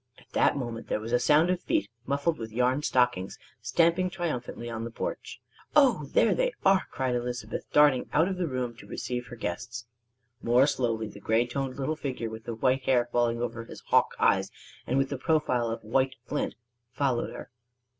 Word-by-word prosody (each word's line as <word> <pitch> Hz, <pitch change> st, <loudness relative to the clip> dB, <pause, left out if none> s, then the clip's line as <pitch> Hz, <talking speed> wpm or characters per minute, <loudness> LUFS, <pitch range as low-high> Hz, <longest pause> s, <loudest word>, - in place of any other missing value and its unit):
At -, -, -21 dB
that -, -, +3 dB
moment 120 Hz, -3 st, -5 dB
there -, -, -1 dB
was 110 Hz, +2 st, -6 dB
a 120 Hz, -, +3 dB
sound 150 Hz, +7 st, +4 dB
of 180 Hz, -1 st, -1 dB
feet, 100 Hz, -, 0 dB, 0.2 s
muffled 140 Hz, +3 st, 0 dB
with 110 Hz, -1 st, -6 dB
yarn 125 Hz, +4 st, +1 dB
stockings, 125 Hz, -9 st, +1 dB, 0.2 s
stamping 170 Hz, +2 st, +2 dB
triumphantly 155 Hz, -10 st, -4 dB
on 115 Hz, -1 st, -4 dB
the 115 Hz, -, -4 dB
porch. 115 Hz, -, -5 dB, 0.4 s
"Oh, 255 Hz, -, +5 dB
there -, -, +4 dB
they -, -, 0 dB
are!" 190 Hz, -1 st, +4 dB
cried 130 Hz, -3 st, -1 dB
Elizabeth, 120 Hz, -2 st, -3 dB
darting 145 Hz, -4 st, +4 dB
out 160 Hz, +4 st, +3 dB
of 190 Hz, -1 st, -2 dB
the 180 Hz, -2 st, -1 dB
room 125 Hz, -3 st, -3 dB
to -, -, -13 dB
receive 125 Hz, -1 st, -4 dB
her 120 Hz, -, -8 dB
guests. 115 Hz, +3 st, -5 dB, 0.6 s
More 120 Hz, +3 st, +4 dB
slowly 115 Hz, -6 st, 0 dB
the 100 Hz, -, -11 dB
gray 110 Hz, +3 st, +2 dB
toned 130 Hz, +1 st, -3 dB
little 140 Hz, +3 st, -1 dB
figure 130 Hz, -6 st, -4 dB
with 110 Hz, 0 st, -9 dB
the 115 Hz, -, -4 dB
white 130 Hz, +3 st, +2 dB
hair 120 Hz, -2 st, +3 dB
falling 120 Hz, 0 st, +1 dB
over 115 Hz, -1 st, -4 dB
his -, -, -11 dB
hawk -, -, +3 dB
eyes -, -, +3 dB, 0.4 s
and 130 Hz, -, +1 dB
with 135 Hz, 0 st, +2 dB
the 140 Hz, -, -4 dB
profile 130 Hz, -6 st, +1 dB
of 115 Hz, -, -4 dB
white 130 Hz, +4 st, +1 dB
flint -, -, -2 dB, 0.4 s
followed 130 Hz, -4 st, 0 dB
her. -, -, -9 dB
125 Hz, 195 wpm, -28 LUFS, 115-145 Hz, 0.6 s, Oh